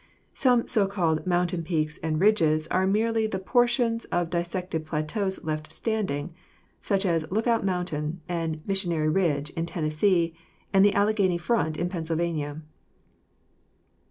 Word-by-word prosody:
Some 245 -3 +3
so 210 -5 +3
called 175 -4 0
mountain 175 -1 +1
peaks 155 -2 -2
and 155 -1 -1
ridges 160 -6 +3
are 185 +1 +2
merely 220 +2 +1
the 195 - -3
portions 240 +3 +1
of 175 -1 -1
dissected 175 -1 -2
plateaus 180 +6 -2
left 155 0 -4
standing, 175 -6 -2 0.5
such 200 0 0
as 165 -3 0
Lookout 225 +3 +1
Mountain 180 -4 -2
and 165 -3 -3
Missionary 175 -6 +1
Ridge 150 -4 +1
in 165 0 -3
Tennessee 165 +2 +1 0.4
and 195 0 +6
the 205 0 +4
Alleghany 200 -3 +2
Front 170 -4 0
in 175 - -1
Pennsylvania. 160 -3 -3
175 Hz, 130 wpm, -26 LUFS, 160-200 Hz, 0.5 s, and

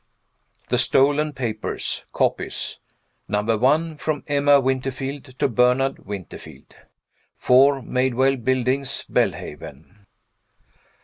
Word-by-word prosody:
THE - - +1
STOLEN 145 +2 +2
PAPERS. 115 -5 -4
(COPIES.) - - -1 0.5
Number 105 +2 0
One. 150 +7 +1
From 150 -1 -3
Emma 145 -1 +4
Winterfield 135 +1 -3
to - - +2
Bernard 125 0 +1
Winterfield. 100 -3 -9 0.6
4 135 +1 +4
Maidwell 130 +2 +1
Buildings, 130 +2 -1
Belhaven. 95 +9 -4
130 Hz, 85 wpm, -22 LUFS, 120-140 Hz, 0.6 s, Emma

